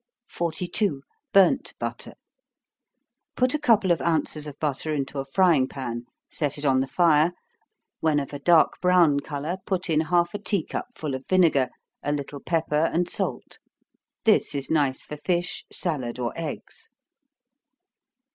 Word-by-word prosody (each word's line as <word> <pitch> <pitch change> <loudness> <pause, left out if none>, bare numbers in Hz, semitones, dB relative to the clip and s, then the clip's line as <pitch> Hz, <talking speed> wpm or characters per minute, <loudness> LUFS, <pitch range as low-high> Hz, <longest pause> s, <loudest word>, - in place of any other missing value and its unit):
42. 170 -2 -1 0.3
Burnt 200 +8 +4
Butter. - - -5 1.2
Put 255 +2 +2
a 300 - 0
couple 215 -8 +3
of 165 -5 +2
ounces 155 -1 -1
of 145 - -9
butter 150 +1 -2
into 140 0 -3
a 135 - -3
frying 155 -3 +3
pan 120 -3 -5 0.2
set 145 -2 -2
it 145 - -6
on 135 -2 +4
the 135 - 0
fire 165 +1 +3 0.7
when 155 -2 +2
of 140 0 -6
a 145 - -5
dark 165 +2 +4
brown 175 -6 +4
color, 150 +4 -4
put 185 -2 -1
in 155 0 +3
half 175 +1 +1
a 205 - -4
tea 200 -4 -1
cup - - -4
full 155 -9 -4
of 130 0 -6
vinegar, 165 -9 +3 0.3
a 145 - -2
little 145 0 -4
pepper 160 -1 0
and 175 +1 0
salt. - - -3 0.7
This - - +3
is 140 -1 -3
nice 145 -4 +1
for 150 - -8
fish, 175 +3 -2
salad, 135 -9 -2
or 120 -2 -2
eggs. 160 -3 -7
155 Hz, 155 wpm, -25 LUFS, 140-175 Hz, 1.2 s, Burnt